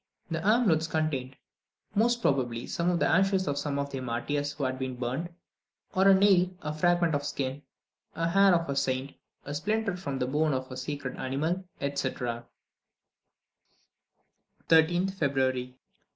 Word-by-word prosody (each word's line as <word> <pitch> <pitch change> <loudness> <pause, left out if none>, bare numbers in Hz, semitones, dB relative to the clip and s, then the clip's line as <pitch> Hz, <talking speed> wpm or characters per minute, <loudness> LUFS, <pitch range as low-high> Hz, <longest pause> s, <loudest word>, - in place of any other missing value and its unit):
The 165 0 -2
amulets 200 -7 +3
contained, 145 -5 -2 0.6
most 235 +2 +2
probably, 120 -4 0
some 170 +1 -1
of 175 - +2
the - - +2
ashes 190 +1 +2
of 140 0 -1
one 145 -2 -2
of 140 0 -2
their 135 - -4
martyrs 145 +4 -2
who 145 0 -5
had 130 0 -1
been 130 -1 -3
burned, 130 +7 -3 0.6
or 190 +1 +4
a 195 - +8
nail, 190 -2 +4
a 150 0 -3
fragment 175 +1 +2
of 145 0 0
skin, 135 -1 -3 0.5
a 165 0 0
hair 195 +1 +5
of 165 -1 0
a 140 - -2
saint, 135 0 -1 0.3
a 145 - -5
splinter 210 +5 -1
from 140 -7 -4
the 125 - 0
bone 150 +2 +1
of 130 0 -4
a - - -5
sacred 130 0 -5
animal, 155 +8 -2
etc. 125 -4 -3 2.2
13th 175 +4 +4
February. 130 -6 -1
145 Hz, 155 wpm, -28 LUFS, 130-175 Hz, 2.2 s, a